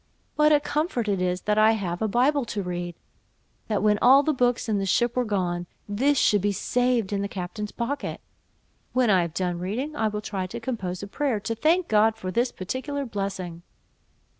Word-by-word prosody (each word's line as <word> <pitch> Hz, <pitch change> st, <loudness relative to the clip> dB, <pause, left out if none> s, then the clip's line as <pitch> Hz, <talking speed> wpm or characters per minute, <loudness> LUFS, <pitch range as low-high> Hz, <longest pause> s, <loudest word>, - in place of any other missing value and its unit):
What 300 Hz, 0 st, +4 dB
a 295 Hz, -, +6 dB
comfort 295 Hz, -, -1 dB
it 195 Hz, -3 st, 0 dB
is 180 Hz, 0 st, 0 dB
that 210 Hz, 0 st, +1 dB
I 220 Hz, +1 st, +6 dB
have 180 Hz, -5 st, -3 dB
a 220 Hz, -, +2 dB
Bible 260 Hz, +6 st, +2 dB
to 210 Hz, -3 st, -3 dB
read! 175 Hz, -1 st, -4 dB, 0.7 s
that 210 Hz, -2 st, 0 dB
when 210 Hz, -1 st, +3 dB
all 270 Hz, +3 st, +7 dB
the 310 Hz, -, +1 dB
books 245 Hz, -3 st, +1 dB
in 210 Hz, -2 st, +1 dB
the 195 Hz, -, -1 dB
ship 240 Hz, +4 st, +2 dB
were 250 Hz, -, +2 dB
gone, 180 Hz, -5 st, -1 dB, 0.2 s
this 265 Hz, +8 st, +1 dB
should 205 Hz, -5 st, +3 dB
be 205 Hz, +1 st, +1 dB
saved 240 Hz, 0 st, 0 dB
in 200 Hz, -, 0 dB
the 200 Hz, -, -1 dB
captain's 200 Hz, +2 st, -5 dB
pocket! 275 Hz, +4 st, -3 dB, 0.7 s
when 250 Hz, -4 st, +3 dB
I 185 Hz, -2 st, +5 dB
have 170 Hz, -1 st, -4 dB
done 180 Hz, -2 st, -1 dB
reading, 245 Hz, -, -3 dB
I 220 Hz, -6 st, +1 dB
will 210 Hz, 0 st, -3 dB
try 190 Hz, -3 st, -3 dB
to 235 Hz, +6 st, -6 dB
compose 200 Hz, -7 st, -4 dB
a -, -, -5 dB
prayer, 255 Hz, +1 st, -1 dB
to 230 Hz, -, -2 dB
thank 325 Hz, +10 st, +2 dB
God 220 Hz, +1 st, +4 dB
for 185 Hz, -4 st, -5 dB
this 240 Hz, +4 st, +1 dB
particular 270 Hz, +9 st, -4 dB
blessing." 195 Hz, -6 st, -4 dB
215 Hz, 205 wpm, -25 LUFS, 190-250 Hz, 0.7 s, all